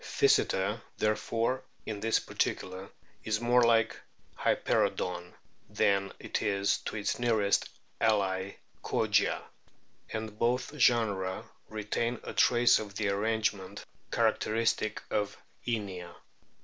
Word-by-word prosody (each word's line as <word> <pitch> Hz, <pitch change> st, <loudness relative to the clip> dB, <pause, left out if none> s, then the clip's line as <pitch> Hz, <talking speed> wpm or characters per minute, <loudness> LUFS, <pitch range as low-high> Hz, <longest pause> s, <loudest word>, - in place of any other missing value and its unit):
Pkysetcr, 100 Hz, +4 st, +2 dB, 0.2 s
therefore, 115 Hz, +4 st, 0 dB, 0.2 s
in 105 Hz, -2 st, -4 dB
this 115 Hz, +2 st, +2 dB
particular, 95 Hz, +1 st, -2 dB, 0.3 s
is 105 Hz, -1 st, 0 dB
more 120 Hz, +1 st, +4 dB
like 115 Hz, -1 st, +4 dB, 0.4 s
Hypcroodon 90 Hz, -1 st, 0 dB, 0.3 s
than 100 Hz, -1 st, +2 dB
it -, -, -3 dB
is 100 Hz, -1 st, +1 dB
to -, -, -6 dB
its 105 Hz, +1 st, -1 dB
nearest 110 Hz, -4 st, +2 dB, 0.3 s
ally 95 Hz, -2 st, +1 dB, 0.3 s
Kogia; -, -, +1 dB, 0.7 s
and 110 Hz, -1 st, -5 dB
both 125 Hz, +5 st, 0 dB
genera 105 Hz, -8 st, +2 dB, 0.2 s
retain 110 Hz, +3 st, -2 dB
a -, -, -6 dB
trace 120 Hz, 0 st, +5 dB
of 100 Hz, -2 st, -7 dB
the 105 Hz, -1 st, 0 dB
arrange 110 Hz, +2 st, +1 dB
ment 95 Hz, -2 st, -10 dB, 0.2 s
characteristic 110 Hz, -1 st, +1 dB
of 105 Hz, -1 st, -1 dB, 0.3 s
Inia. 95 Hz, -7 st, -3 dB
105 Hz, 110 wpm, -30 LUFS, 100-115 Hz, 0.7 s, trace